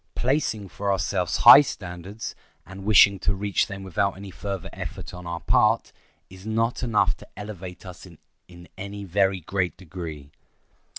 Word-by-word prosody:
Placing 120 Hz, -6 st, 0 dB
for 100 Hz, +2 st, -2 dB
ourselves 95 Hz, -1 st, 0 dB
high 120 Hz, +4 st, +12 dB
standards, 95 Hz, -4 st, -6 dB, 0.3 s
and 95 Hz, +2 st, -10 dB
wishing 100 Hz, -1 st, +6 dB
to 95 Hz, -, 0 dB
reach 100 Hz, 0 st, 0 dB
them 100 Hz, -2 st, -7 dB
without 95 Hz, +1 st, -1 dB
any 100 Hz, 0 st, -9 dB
further 95 Hz, +3 st, -6 dB
effort -, -, -7 dB
on 90 Hz, -1 st, -9 dB
our 85 Hz, -1 st, -4 dB
part, -, -, +2 dB, 0.4 s
is 95 Hz, 0 st, -14 dB
not 115 Hz, +2 st, -1 dB
enough 115 Hz, -4 st, +2 dB
to -, -, -14 dB
elevate 95 Hz, -3 st, -8 dB
us 90 Hz, 0 st, -10 dB, 0.4 s
in 85 Hz, 0 st, -14 dB
any 100 Hz, +1 st, -6 dB
very 95 Hz, 0 st, +1 dB
great 90 Hz, +1 st, -2 dB
degree. 80 Hz, -5 st, -8 dB
95 Hz, 155 wpm, -25 LUFS, 90-100 Hz, 0.4 s, high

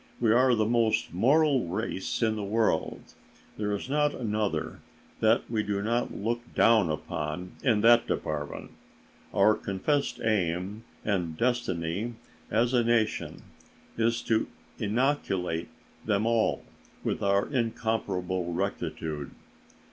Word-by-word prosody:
We 115 Hz, -2 st, +3 dB
are 125 Hz, +1 st, +5 dB
the 110 Hz, -1 st, +2 dB
most 115 Hz, -5 st, +1 dB
moral 135 Hz, -, +3 dB
race 95 Hz, +3 st, -2 dB
in 110 Hz, -1 st, +2 dB
the 105 Hz, -, -4 dB
world; 110 Hz, +3 st, -1 dB, 0.4 s
there 105 Hz, -1 st, -2 dB
is 100 Hz, -, -6 dB
not 150 Hz, +1 st, +1 dB
another 105 Hz, -9 st, -2 dB, 0.4 s
that 110 Hz, +1 st, +3 dB
we 110 Hz, -2 st, 0 dB
do 100 Hz, -1 st, -2 dB
not 120 Hz, +3 st, 0 dB
look 115 Hz, +3 st, -2 dB
down 110 Hz, -7 st, +5 dB
upon 75 Hz, +3 st, -4 dB
in 110 Hz, -6 st, +3 dB
that 120 Hz, +1 st, +6 dB
department; 75 Hz, -1 st, -3 dB, 0.6 s
our 110 Hz, -, +5 dB
confessed 125 Hz, +6 st, -1 dB
aim 100 Hz, 0 st, -1 dB, 0.2 s
and 90 Hz, -6 st, -1 dB
destiny 115 Hz, -3 st, -1 dB, 0.3 s
as 115 Hz, +3 st, +2 dB
a 120 Hz, -2 st, +4 dB
nation 115 Hz, -2 st, 0 dB, 0.5 s
is 115 Hz, +1 st, +1 dB
to 110 Hz, -1 st, +1 dB, 0.3 s
inoculate 100 Hz, -, 0 dB, 0.3 s
them 105 Hz, 0 st, +1 dB
all 115 Hz, -1 st, +1 dB, 0.4 s
with -, -, -2 dB
our 100 Hz, 0 st, +2 dB
incomparable 100 Hz, -8 st, -1 dB
rectitude. 75 Hz, -3 st, -3 dB
110 Hz, 120 wpm, -28 LUFS, 95-120 Hz, 0.6 s, that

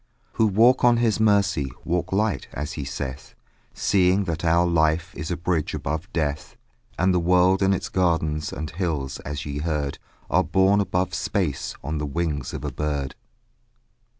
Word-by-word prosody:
Who 110 Hz, -, +2 dB
walk 115 Hz, +6 st, +4 dB
on 120 Hz, -1 st, +5 dB
his 115 Hz, -3 st, +1 dB
mercy 100 Hz, -9 st, +2 dB, 0.2 s
Walk 90 Hz, +1 st, -1 dB
light, 105 Hz, +1 st, 0 dB
as 75 Hz, +4 st, -4 dB
he 70 Hz, -, -5 dB
saith, 70 Hz, 0 st, -6 dB, 0.4 s
Seeing 95 Hz, +1 st, +3 dB
that 85 Hz, -3 st, -3 dB
our 85 Hz, +1 st, +3 dB
life 80 Hz, 0 st, +1 dB
Is 75 Hz, +3 st, -5 dB
a 90 Hz, -, -2 dB
bridge 85 Hz, -2 st, -1 dB
above 80 Hz, +5 st, -4 dB
death; 75 Hz, -4 st, -2 dB, 0.4 s
And 90 Hz, +1 st, +3 dB
the 90 Hz, -, +3 dB
world 90 Hz, +2 st, +3 dB
and 95 Hz, 0 st, +3 dB
its 95 Hz, -, -1 dB
gardens 80 Hz, -4 st, 0 dB
And 75 Hz, +1 st, -5 dB
hills, 80 Hz, -7 st, -3 dB
as 70 Hz, 0 st, -5 dB
ye 70 Hz, 0 st, -4 dB
heard, 75 Hz, -3 st, -2 dB, 0.3 s
Are -, -, +3 dB
born 95 Hz, +2 st, +3 dB
above 90 Hz, -2 st, -1 dB
space 80 Hz, -4 st, -2 dB
On 75 Hz, +3 st, -3 dB
the 75 Hz, -, -2 dB
wings 75 Hz, 0 st, -2 dB
of -, -, -6 dB
a -, -, -2 dB
bird. 75 Hz, -3 st, -2 dB
85 Hz, 170 wpm, -24 LUFS, 75-95 Hz, 0.4 s, on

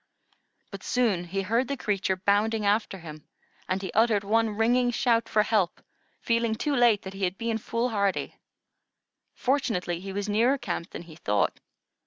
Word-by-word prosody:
But -, -, -8 dB
soon 220 Hz, -9 st, +1 dB
he 195 Hz, +3 st, -3 dB
heard 230 Hz, +6 st, +1 dB
the 280 Hz, -, -3 dB
creature 195 Hz, -4 st, 0 dB
bounding 205 Hz, +3 st, +1 dB
after 205 Hz, -1 st, +1 dB
him, 155 Hz, -4 st, -11 dB, 0.4 s
and 190 Hz, +1 st, -1 dB
he 190 Hz, -, -4 dB
uttered 220 Hz, -2 st, +3 dB
one 225 Hz, +2 st, +2 dB
ringing 245 Hz, +2 st, +3 dB
shout 235 Hz, -1 st, +1 dB
for 210 Hz, -, +3 dB
help, 210 Hz, -6 st, +1 dB, 0.4 s
feeling 230 Hz, -1 st, +1 dB
too 285 Hz, +5 st, -1 dB
late 240 Hz, -4 st, +4 dB
that 190 Hz, -, -7 dB
he 195 Hz, 0 st, -6 dB
had 185 Hz, +1 st, 0 dB
been 230 Hz, -1 st, -2 dB
foolhardy. 220 Hz, -4 st, -1 dB, 1.0 s
Fortunately, 225 Hz, -11 st, 0 dB
he 195 Hz, +2 st, -7 dB
was 200 Hz, +1 st, -3 dB
nearer 230 Hz, +6 st, +3 dB
camp 235 Hz, -8 st, -4 dB
than -, -, -8 dB
he 165 Hz, -2 st, -13 dB
thought. 100 Hz, -, 0 dB
210 Hz, 165 wpm, -27 LUFS, 190-230 Hz, 1.0 s, late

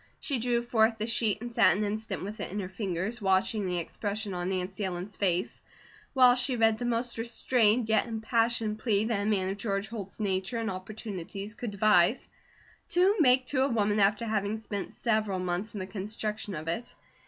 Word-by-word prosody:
She 275 Hz, -5 st, -1 dB
drew 240 Hz, 0 st, +1 dB
forth 225 Hz, -1 st, +2 dB
the 215 Hz, -, -2 dB
sheet 220 Hz, -2 st, +1 dB
and 240 Hz, 0 st, -5 dB
sat 225 Hz, -5 st, +4 dB
an 210 Hz, -, 0 dB
instant 210 Hz, -2 st, -3 dB
with 210 Hz, +3 st, -6 dB
it -, -, -4 dB
in 205 Hz, -, -3 dB
her 185 Hz, -2 st, -4 dB
fingers, 195 Hz, +3 st, -3 dB
watching 190 Hz, +1 st, +2 dB
the 180 Hz, -1 st, -1 dB
expression 205 Hz, +4 st, -3 dB
of 175 Hz, 0 st, -3 dB
Nancy 190 Hz, +2 st, -3 dB
Ellen's 185 Hz, +1 st, -4 dB
face, 180 Hz, -2 st, 0 dB, 0.5 s
while 255 Hz, -2 st, +7 dB
she 250 Hz, +1 st, +1 dB
read 225 Hz, -1 st, +3 dB
the 245 Hz, -, -2 dB
most 240 Hz, 0 st, -1 dB
restrained 235 Hz, -1 st, +2 dB
yet 220 Hz, +1 st, +2 dB
impassioned 225 Hz, -1 st, 0 dB
plea 215 Hz, -2 st, +1 dB
that 220 Hz, -3 st, 0 dB
a 205 Hz, -, 0 dB
man 190 Hz, -3 st, +1 dB
of 195 Hz, -, -3 dB
George 200 Hz, -1 st, -2 dB
Holt's 205 Hz, -4 st, -7 dB
nature 195 Hz, +2 st, -1 dB
and 225 Hz, -3 st, -1 dB
opportunities 195 Hz, 0 st, -6 dB
could 235 Hz, 0 st, -5 dB
devise 205 Hz, +1 st, +3 dB, 0.6 s
to 370 Hz, +4 st, +4 dB
make 255 Hz, -4 st, +5 dB
to 260 Hz, 0 st, 0 dB
a 270 Hz, -, +4 dB
woman 210 Hz, -3 st, +1 dB
after 205 Hz, +3 st, +3 dB
having 215 Hz, -1 st, -1 dB
spent 210 Hz, -2 st, -5 dB
several 215 Hz, -4 st, 0 dB
months 185 Hz, +4 st, -3 dB
in -, -, -3 dB
the 185 Hz, -, -3 dB
construction 210 Hz, +1 st, -4 dB
of 155 Hz, +1 st, -6 dB
it. 220 Hz, +9 st, -3 dB
215 Hz, 195 wpm, -29 LUFS, 195-230 Hz, 0.6 s, while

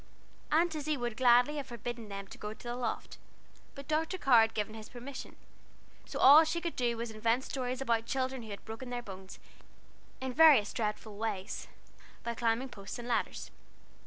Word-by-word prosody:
Aunt 330 Hz, +2 st, +3 dB
Izzie 305 Hz, -1 st, -1 dB
would 240 Hz, -2 st, -3 dB
gladly 250 Hz, +4 st, +5 dB
have 280 Hz, -2 st, -4 dB
forbidden 235 Hz, -2 st, -6 dB
them 200 Hz, 0 st, -6 dB
to -, -, -10 dB
go 210 Hz, +1 st, -5 dB
the 240 Hz, +1 st, -6 dB
loft, 245 Hz, -2 st, -4 dB, 0.6 s
but 280 Hz, -1 st, -9 dB
Dr. 320 Hz, +4 st, 0 dB
Carr 255 Hz, -9 st, +6 dB
had 225 Hz, 0 st, +1 dB
given 215 Hz, 0 st, -2 dB
his 220 Hz, -1 st, -9 dB
permission, 255 Hz, +2 st, -8 dB, 0.7 s
so -, -, -5 dB
all 290 Hz, +4 st, +9 dB
she 320 Hz, +2 st, -1 dB
could 340 Hz, -1 st, -4 dB
do 240 Hz, -2 st, 0 dB
was 235 Hz, 0 st, -3 dB
to -, -, -11 dB
invent 230 Hz, +4 st, +2 dB
stories 255 Hz, -1 st, -3 dB
about 230 Hz, -3 st, 0 dB
children 260 Hz, -1 st, -1 dB
who 220 Hz, -, -10 dB
had 200 Hz, -, -8 dB
broken 225 Hz, +3 st, -7 dB
their 245 Hz, 0 st, -4 dB
bones 190 Hz, -2 st, -10 dB, 0.8 s
in 260 Hz, -1 st, -4 dB
various 290 Hz, -8 st, +6 dB
dreadful 210 Hz, -1 st, -3 dB
ways, 210 Hz, -2 st, -3 dB, 0.6 s
by 235 Hz, -, -2 dB
climbing 235 Hz, +3 st, 0 dB
posts 200 Hz, -4 st, -8 dB
and 240 Hz, 0 st, -7 dB
ladders. 240 Hz, -, -2 dB
240 Hz, 185 wpm, -32 LUFS, 220-270 Hz, 0.8 s, all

